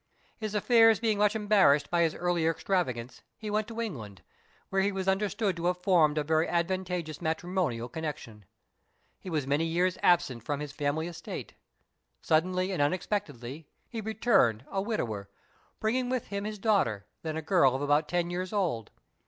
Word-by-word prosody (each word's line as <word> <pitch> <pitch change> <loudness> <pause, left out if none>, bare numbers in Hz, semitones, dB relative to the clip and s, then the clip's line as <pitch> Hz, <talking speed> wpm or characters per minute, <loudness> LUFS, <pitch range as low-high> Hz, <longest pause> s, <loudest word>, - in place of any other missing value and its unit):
His 215 -1 -5
affairs 225 0 +5
being 220 -3 +1
much 210 +1 +3
embarrassed 195 -10 +4
by 175 -1 +3
his 165 -2 +2
earlier 175 -2 +1
extravagance, 130 -9 -2 0.2
he 215 -1 -5
went 215 0 0
to 230 0 -7
England, 115 - -5 0.5
where 195 0 +1
he 200 +1 +1
was 190 -1 -4
understood 195 +1 +1
to 170 - -4
have 180 0 -1
formed 160 -6 +4
a 150 - +2
very 160 +2 +2
advantageous 175 -2 -2
matrimonial 160 -7 -1
connexion. 140 - -6 0.7
He 185 - -8
was 155 -5 -1
many 145 +4 +1
years 175 +2 0
absent 170 -9 +3
from 145 +5 -3
his 150 -1 -5
family 145 +2 -1
estate. 175 0 -7 0.7
Suddenly 185 +4 +1
and 180 - -1
unexpectedly 145 - -2 0.2
he 230 -2 -5
returned 200 - +2
a 195 - 0
widower, 110 - -3 0.5
bringing 245 +3 0
with 255 -2 -2
him 200 0 -3
his 215 0 -4
daughter, 190 - +1 0.2
then 160 -1 -3
a 160 - -4
girl 150 -7 +4
of 135 - -2
about 145 +1 +2
ten 175 0 0
years 180 +1 -3
old. 170 - -1
175 Hz, 170 wpm, -29 LUFS, 145-200 Hz, 0.7 s, affairs